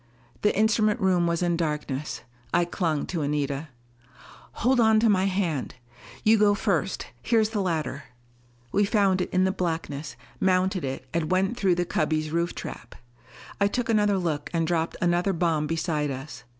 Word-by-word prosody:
The 210 - +2
instrument 215 +1 +3
room 185 -3 +2
was 170 +1 0
in 175 -1 +1
darkness. 150 -3 -3 0.3
I 175 0 +3
clung 165 -4 -1
to 170 -4 -3
Anita. 145 0 -1 1.0
"Hold 255 0 +4
on 220 -1 +5
to 225 0 +3
my 190 -2 +3
hand. 180 -10 -1 0.5
You 220 0 +5
go 205 -1 +4
first 195 -3 -1 0.2
here 230 - +2
is 220 0 +1
the 210 -3 -1
ladder!" 155 -6 -2 0.7
We 205 - +3
found 200 -3 +2
it - - -2
in 185 0 +2
the 190 - +2
blackness, 160 -5 -3 0.2
mounted 185 -1 +2
it 130 -1 -4
and 165 -2 -1
went 190 +4 +1
through 195 -7 +2
the 175 0 0
cubby's 155 -6 -1
roof 170 +1 -1
trap. - - -8 0.6
I 200 - +4
took 245 +3 -2
another 210 -3 +3
look 155 -5 -2
and 165 -1 +1
dropped 165 0 -1
another 175 +3 +2
bomb 160 -3 0
beside 160 -2 -1
us. 135 -1 -7
175 Hz, 170 wpm, -26 LUFS, 155-200 Hz, 1.0 s, on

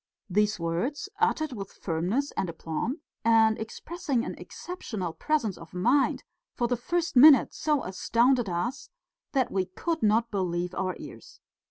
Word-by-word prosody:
These 210 +1 +2
words, 225 - -2
uttered 315 - +1
with 200 -4 -6
firmness 190 - -1
and 185 - -2
aplomb, 170 - -4 0.2
and 225 -1 +4
expressing 270 +3 -3
an - - -4
exceptional 220 - -6
presence 260 - -1
of 165 +2 -12
mind, 245 +10 +2 0.3
for 240 - 0
the 245 - +1
first 340 +8 -2
minute 275 0 +8
so 300 -3 0
astounded 235 +4 +2
us 205 +10 -3 0.4
that 265 -3 +1
we 190 -1 0
could 325 - -3
not 225 +2 +2
believe 180 -3 -1
our 185 0 -2
ears. - - -12
230 Hz, 145 wpm, -28 LUFS, 185-280 Hz, 0.4 s, minute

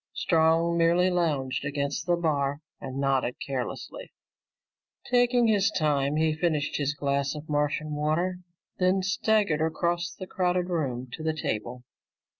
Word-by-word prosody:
Strong 165 +1 +2
merely 175 +2 +4
lounged 140 -7 0
against 140 +2 -2
the 175 - +4
bar 145 -4 0 0.2
and 130 0 -6
nodded 135 -3 +1
carelessly. 140 - -5 0.9
Taking 245 -1 +3
his 210 -2 +3
time, 150 -6 +1
he 155 0 +2
finished 155 -2 0
his 145 0 -1
glass 140 0 -1
of 150 +1 -8
Martian 150 +1 -1
water, 160 +5 0 0.4
then 185 +1 +2
swaggered 200 -4 +1
across 170 +2 0
the 185 - -8
crowded 180 -1 0
room 130 -7 -2
to 160 - -6
the 160 0 -1
table. 120 -3 -4
155 Hz, 135 wpm, -27 LUFS, 140-180 Hz, 0.9 s, merely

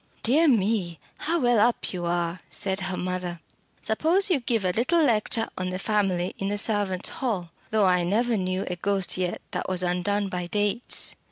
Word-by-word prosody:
"Dear 300 +8 +4
me, 200 - +1 0.2
how 335 +2 0
well 245 -2 +3
up 235 0 +1
you 175 -1 -3
are!" 170 0 -1
said 190 0 -1
her 190 -1 -3
mother. 180 -1 -3 0.4
"Suppose 340 - +3
you 320 - +3
give 230 -5 0
a 180 - +2
little 315 - +2
lecture 225 -2 +1
on 185 0 -2
the 185 - -3
family 195 -3 0
in 195 - -2
the 205 +1 -1
servants' 205 -3 +1
hall. 195 -10 -3 0.2
Though 215 -2 +3
I 180 -1 +3
never 225 +6 +1
knew 185 -1 -1
a 180 - -3
ghost 195 0 0
yet 180 -1 -2
that - - -3
was 185 -1 +2
undone 195 +3 0
by 180 -2 -4
dates." 205 +4 0
195 Hz, 185 wpm, -26 LUFS, 180-225 Hz, 0.4 s, Dear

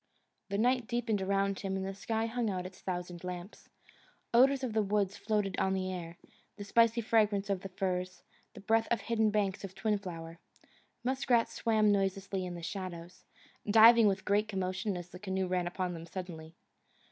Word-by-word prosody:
The 200 - -1
night 245 +1 +2
deepened 235 -4 -1
around 195 0 0
him 195 -1 -3
and 190 - -3
the 195 - -4
sky 220 +3 -2
hung 230 0 -1
out 185 -2 -3
its 185 0 -10
thousand 180 -1 -5
lamps. 180 +2 -7 0.6
Odours 265 +3 +5
of 245 -4 -2
the 220 - +3
woods 200 -1 0
floated 210 -3 -1
on 190 0 +1
the 185 0 -2
air: 170 -1 -7 0.4
the 205 - -6
spicy 230 +3 +3
fragrance 210 -3 +2
of 190 -2 -1
the 195 - -7
firs; 185 -1 -3 0.3
the - - -10
breath 225 +2 +2
of 235 - +1
hidden 220 -2 +1
banks 205 -2 -1
of 190 -1 -7
twin 215 -2 0
flower. 165 -3 -8 0.6
Muskrats 250 -2 +1
swam 215 -2 +2
noiselessly 195 -1 0
in 175 - -6
the 170 - -8
shadows, 180 -1 -6 0.4
diving 225 +1 +8
with 195 -1 +1
a - - -30
great 205 +1 +2
commotion 190 0 -2
as 175 0 -8
the 180 - -11
canoe 190 -1 -2
ran 180 -1 -1
upon 180 0 -2
them 165 0 -8
suddenly. 165 -3 -7
195 Hz, 185 wpm, -32 LUFS, 185-220 Hz, 0.6 s, diving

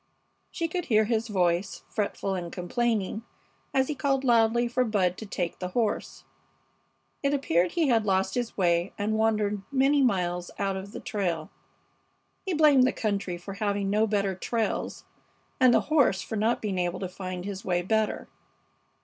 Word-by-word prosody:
She 335 -2 -2
could 350 +1 -3
hear 215 -3 +3
his 225 0 0
voice, 180 -3 0
fretful 200 -2 -2
and 175 -2 -4
complaining, 215 +2 -1 0.5
as 265 -1 +2
he 300 - -1
called 275 -1 0
loudly 235 -1 +3
for 250 +2 +1
Bud 195 -6 +1
to 220 - -8
take 175 -3 -3
the 180 - -3
horse. 225 -3 -1 1.0
It 280 0 +1
appeared 175 - +1
he 325 -5 +2
had 230 -3 +3
lost 190 -2 +1
his 245 -2 -3
way 175 -1 +1
and 210 +1 -1
wandered 210 -2 +1
many 275 +1 +3
miles 180 -7 0
out 195 -1 -1
of 190 +1 -6
the - - -6
trail. 175 -7 -2 1.0
He 370 - 0
blamed 295 -4 +6
the - - +2
country 200 -5 -2
for 185 +3 -8
having 200 -1 -1
no 215 +2 +3
better 200 -2 0
trails, 225 +4 -2 0.5
and 255 -2 +6
the - - +4
horse 280 -11 +2
for 220 - -5
not 220 +3 +1
being 195 -3 -1
able 175 0 -1
to 190 - -3
find 185 0 -6
his 200 -1 -5
way 175 -1 0
better. 220 +3 0
210 Hz, 170 wpm, -27 LUFS, 185-240 Hz, 1.0 s, blamed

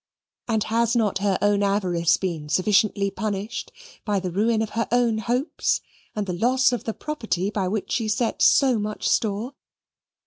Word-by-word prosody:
And 220 -3 +1
has 230 +2 +1
not 215 -5 +1
her 195 -2 +1
own 205 0 +3
avarice 185 -4 +2
been 165 -6 -4
sufficiently 200 +2 +2
punished 210 +2 -4 0.3
by 205 -2 0
the 185 -1 -4
ruin 220 +4 +1
of 220 - -6
her 230 -1 -1
own 235 -2 +2
hopes 245 +8 0 0.4
and 210 -1 -2
the 185 - -3
loss 250 +8 +2
of 245 -4 -3
the 225 - -2
property 215 - -3
by 195 -3 -1
which 200 +2 -3
she 225 -3 0
set 225 +2 -1
so 260 -5 +5
much 210 0 -3
store? 220 +4 0
215 Hz, 170 wpm, -24 LUFS, 195-230 Hz, 0.4 s, so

